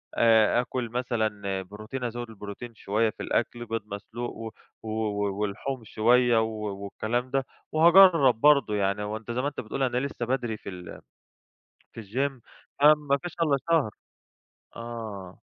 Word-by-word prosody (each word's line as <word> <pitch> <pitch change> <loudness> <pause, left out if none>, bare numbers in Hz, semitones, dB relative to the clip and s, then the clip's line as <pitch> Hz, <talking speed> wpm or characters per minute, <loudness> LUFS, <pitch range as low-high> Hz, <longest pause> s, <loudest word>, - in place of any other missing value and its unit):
آآ 115 +1 +5
أكُل 125 -1 -4
مثلًا 110 -5 -2
بروتين، 110 +7 -7
أزوِّد 120 -1 -4
البروتين 110 +2 -9
شوية 110 +1 0
في - - -8
الأكل، 120 0 -1
بيض 115 0 -3
مسلوق، 110 +4 -6
و 115 0 -5 0.3
و 110 - -6 0.5
ولحوم 115 +5 -3
شوية، 120 +2 +3
و 110 - 0 0.4
والكلام 120 +5 -3
ده. 135 -1 0 0.3
وهاجرَّب 165 - +7
برضو 140 -7 +5
يعني، 100 0 0
هو 105 +1 -3
أنت 115 +1 -8
زي 125 +2 -1
ما 140 - -1
أنت 145 - -5
بتقول 125 +4 -3
أنا 125 -1 0
لسه 130 -2 -2
بدري 120 -3 -1
في - - -9
ال 90 -2 -9 0.9
في 115 - -8
الGym 130 +7 -1 0.5
ما 155 +1 +9
ما 140 -2 0
فيش 175 - -6
ألا 140 -4 +3
شهر. 155 -10 +3 0.9
آه. 110 -6 -7
115 Hz, 155 wpm, -27 LUFS, 105-130 Hz, 0.9 s, ما